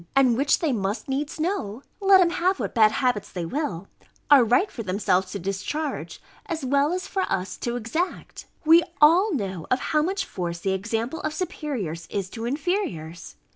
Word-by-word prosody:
and 260 -3 +5
which, 280 +4 +3
they 320 -4 0
must 205 -2 -2
needs 285 +3 -3
know 285 - -2 0.2
(let 390 -1 +6
'em 345 -2 +3
have 370 +2 +1
what - - -3
bad 215 -2 +5
habits 245 -6 0
they 175 -3 -4
will) 200 - -3 0.4
are 275 -4 +9
right 250 - +2
for 235 - -6
themselves 190 -2 0
to - - -3
discharge, 200 - -4 0.3
as 325 -5 -3
well 280 +3 +2
as 365 +1 -2
for 385 - -2
us 185 0 -2
to 240 0 -3
exact. 245 - -4 0.2
We 325 +2 +7 0.2
all 340 +8 +6
know 190 - -4
of 255 - +3 0.2
how 305 - +4
much 385 +4 -1
force 170 -2 -4
the 190 +3 -1
example 225 +9 -2
of 310 0 -3
superiors 235 - -4
is 195 -2 -3
to 230 -1 -5
inferiors. 250 - -3
255 Hz, 180 wpm, -25 LUFS, 195-315 Hz, 0.4 s, are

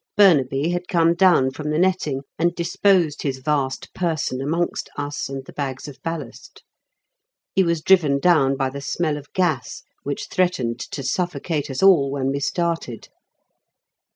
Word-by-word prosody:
Burnaby 150 -7 +4
had 175 0 -2
come 170 -3 +3
down 170 -7 +4
from 150 +2 -5
the 150 - 0
netting 175 -6 +1 0.2
and 170 +1 +1
disposed 175 -2 +2
his 135 -2 -2
vast 135 -1 -2
person 160 -7 -2
amongst 165 +5 -2
us 145 -1 -4
and 135 -1 -6
the - - -12
bags 135 -1 -4
of 145 - -11
ballast. 160 -7 -7 0.9
He 190 - +3
was 170 -3 0
driven 160 -7 +4
down 140 -4 +3
by 135 -1 -1
the 140 +1 -7
smell 155 +1 -1
of 145 -1 -10
gas, 160 -10 -1 0.2
which 140 0 -4
threatened 170 -11 0
to 140 +2 -6
suffocate 160 0 -2
us 135 +6 -3
all 170 -8 +6
when 135 -1 -1
we 140 - -2
started. 165 -5 -2
150 Hz, 155 wpm, -22 LUFS, 135-175 Hz, 0.9 s, all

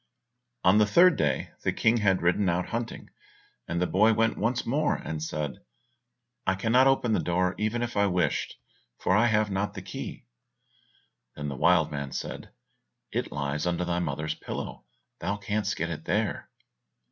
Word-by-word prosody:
On 95 +3 +5
the 105 - +4
third 175 - +6
day - - 0
the - - +1
King 115 +2 +2
had 95 -5 +2
ridden 90 +3 +2
out 90 +1 -1
hunting, 115 0 -5 0.6
and 85 +1 -2
the 90 - +2
boy 110 +5 +4
went 115 +1 +2
once 120 +4 -1
more 145 +5 +1
and 80 -1 -5
said, 75 -2 -3 0.9
"I 95 - +3
cannot 120 +7 +4
open 130 -4 +2
the - - +2
door 90 +1 +1
even 110 +3 0
if 120 0 -4
I 100 0 +3
wished, 90 -5 0 0.4
for 95 - +1
I 110 +3 +4
have 105 -2 +2
not 95 +1 -2
the - - -6
key." - - -7 1.1
Then 75 0 -4
the 70 - -5
wild 80 +2 +3
man 70 -2 -4
said, - - -5 0.6
"It - - -2
lies 75 +3 -2
under 90 0 0
thy 85 0 0
mother's 75 -2 -2
pillow, - - -7 0.3
thou 100 +4 -2
canst 105 0 -1
get 85 +1 -2
it 80 - -6
there." - - -1
95 Hz, 170 wpm, -27 LUFS, 85-110 Hz, 1.1 s, third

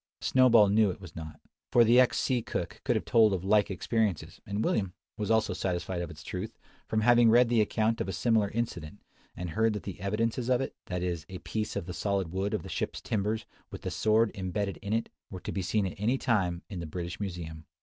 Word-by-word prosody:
Snowball 120 -5 +5
knew 105 +1 +4
it 90 - -5
was 90 -4 -12
not: 80 -2 -8 0.3
for 120 - +6
the 120 +2 +6
ex 130 - +4
sea 125 -3 +1
cook - - -5
could - - +1
have - - -1
told 110 -3 +5
of 95 -2 -2
like 105 +2 +3
experiences; 100 -1 -1
and 100 +2 -1
William 95 -4 0 0.2
was 105 -1 -3
also 110 -4 +2
satisfied 90 -1 -2
of 85 - -4
its 75 -2 -11
truth, 95 +6 -5 0.3
from 110 - 0
having 120 0 +6
read 120 +1 +5
the 120 -2 +4
account 110 +2 +1
of 95 - -2
a - - -1
similar 105 +2 +2
incident, 105 -6 -4 0.4
and 90 -2 -4
heard 110 +3 +2
that 105 - -5
the 100 - -7
evidences 115 +5 -1
of 125 -1 +3
it, 135 - -3
that 90 0 -3
is, 85 -4 -3
a 95 - -6
piece 110 +3 -4
of 100 -4 -3
the 90 - -6
solid 100 -4 -1
wood 95 +2 -1
of - - -4
the - - -8
ship's - - -3
timbers, 105 +1 -2 0.2
with - - -9
the - - -3
sword 110 +1 +2
imbedded 100 +1 -3
in 100 - -6
it, 115 +1 0 0.2
were 95 - -7
to - - -5
be 95 - -2
seen 100 +3 0
at 95 - -5
any 115 +6 +1
time 95 -9 0
in 95 -4 -6
the 85 - -5
British 85 +2 -5
Museum. 85 -5 -6
100 Hz, 230 wpm, -29 LUFS, 90-110 Hz, 0.4 s, for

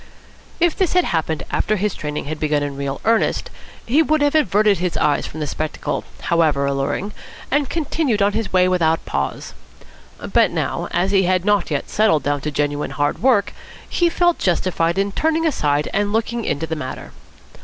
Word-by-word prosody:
If 345 -1 +3
this 375 -3 0
had 360 0 +4
happened 160 -2 -1
after 215 - +1
his 205 -1 -1
training 150 -1 -4
had 155 +1 -5
begun 150 -1 +1
in 145 -1 -4
real 140 0 -4
earnest, 225 0 +1 0.3
he 275 +7 +3
would 310 -1 +2
have 290 - +2
averted 210 - +3
his 180 -1 -1
eyes 145 - +1
from 155 - -8
the - - -1
spectacle, 155 +1 -3 0.2
however 155 -5 +2
alluring, 140 +9 -2 0.4
and 285 -1 +1
continued 300 -7 -1
on 200 0 +2
his 225 -2 -2
way 185 0 +4
without 165 -3 +2
a - - -21
pause. 70 0 -3 0.7
But - - +2
now, - - -2
as 180 +3 0
he 195 -2 +3
had 185 0 +1
not 205 -4 +2
yet 145 -3 -2
settled 210 -8 +2
down 145 -1 -1
to 150 - -2
genuine 145 0 -1
hard 145 0 -1
work, 230 -5 +3 0.3
he 345 -1 +2
felt 350 0 +2
justified 170 -1 0
in 200 +1 +1
turning 320 +8 0
aside 150 - +1
and 205 0 0
looking 230 +1 -1
into 160 - -1
the 160 - -3
matter. 130 -4 -6
185 Hz, 185 wpm, -20 LUFS, 150-225 Hz, 0.7 s, had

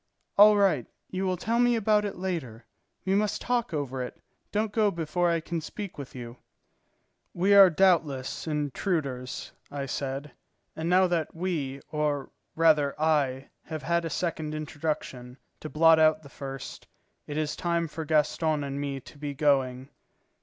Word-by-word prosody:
"All 210 +1 +8
right. 185 - +2 0.2
You 190 +1 -1
will 185 -1 0
tell 230 +6 0
me 245 0 +4
about 210 -1 +2
it 200 - -4
later. 155 -12 -4 0.4
We 190 - +1
must 210 +1 +1
talk 240 -4 -1
over 135 -4 -3
it; 125 - -6 0.3
don't 215 0 0
go 215 -1 +3
before 170 0 0
I 170 -1 +2
can 165 0 -3
speak 195 +1 -7
with 135 -2 -8
you." 120 -1 -8 1.0
"We 190 +4 +3
are 195 -2 +9
doubtless 160 -7 +1
intruders," 145 -3 -2 0.2
I 140 -1 -4
said, 135 +2 -4 0.4
"and 160 +1 -3
now 185 +1 +5
that 170 -4 -1
we, 155 -6 -3
or 150 -2 -1 0.2
rather 150 -4 +3
I, 140 -4 +1 0.2
have 155 -3 -6
had 170 +3 +1
a 165 - -3
second 155 -1 -2
introduction, 145 -5 -4 0.2
to 155 - -7
blot 165 +1 +5
out 155 0 +4
the 140 - -12
first, 135 -2 -8 0.4
it 145 - -4
is 155 -1 -1
time 170 -1 0
for 160 +1 -6
Gaston 155 0 +1
and 140 0 -4
me 140 -1 -3
to 145 - -15
be 145 -1 -4
going." 135 -3 +1
155 Hz, 160 wpm, -28 LUFS, 140-180 Hz, 1.0 s, are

